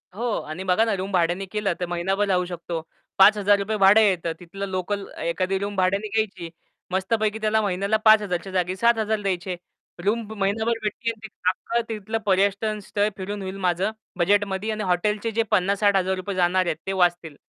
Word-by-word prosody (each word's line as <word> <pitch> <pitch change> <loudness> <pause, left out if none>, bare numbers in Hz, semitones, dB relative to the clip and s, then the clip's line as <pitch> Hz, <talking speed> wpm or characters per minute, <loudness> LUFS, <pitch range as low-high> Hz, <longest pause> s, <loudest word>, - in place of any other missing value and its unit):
हो. 235 +1 -2
आणि 155 +5 -6
बघा 190 +4 +3
ना 220 - 0
रूम 190 +1 -4
भाड्याने 180 +1 +1
केलं, 200 -1 -1
तर 180 - -1
महिनाभर 190 +4 0
राहू 180 -2 +1
शकतो. 170 -2 -5 0.4
5000 205 +1 +4
भाडं 200 +2 +6
येतं 180 -5 +2
तिथलं 195 +3 -6
लोकल 190 +2 -3 0.2
एखादी 185 +3 -1
रूम 200 0 -4
भाड्याने 195 +3 +1
घ्यायची. 200 -5 -2 0.4
मस्तपैकी 210 +3 0
त्याला 215 0 +2
महिन्याला 200 +1 0
5000च्या 200 -4 +4
जागी 185 0 0
7000 220 0 +2
द्यायचे. 185 -2 -2 0.5
रूम 215 +4 +1 0.2
महिनाभर 220 +4 0
भेटतील 230 +2 -2
आणि 220 -1 -11 0.2
अख्खं 235 +5 -1
तिथलं 220 0 -3
पर्यटन 200 +2 +1
स्थळ 205 +2 0
फिरून 200 +2 -5
होईल 190 0 -5
माझं 180 +4 +1 0.3
बजेटमध्ये. 200 +3 +1
आणि 215 0 -3
हॉटेलचे 210 +4 0
जे 225 +1 +1
50000-60000 195 -1 +1
जाणार 185 0 +2
आहेत 170 - 0
ते - - 0
वाचतील. 175 -4 +1
195 Hz, 160 wpm, -24 LUFS, 185-215 Hz, 0.5 s, भाडं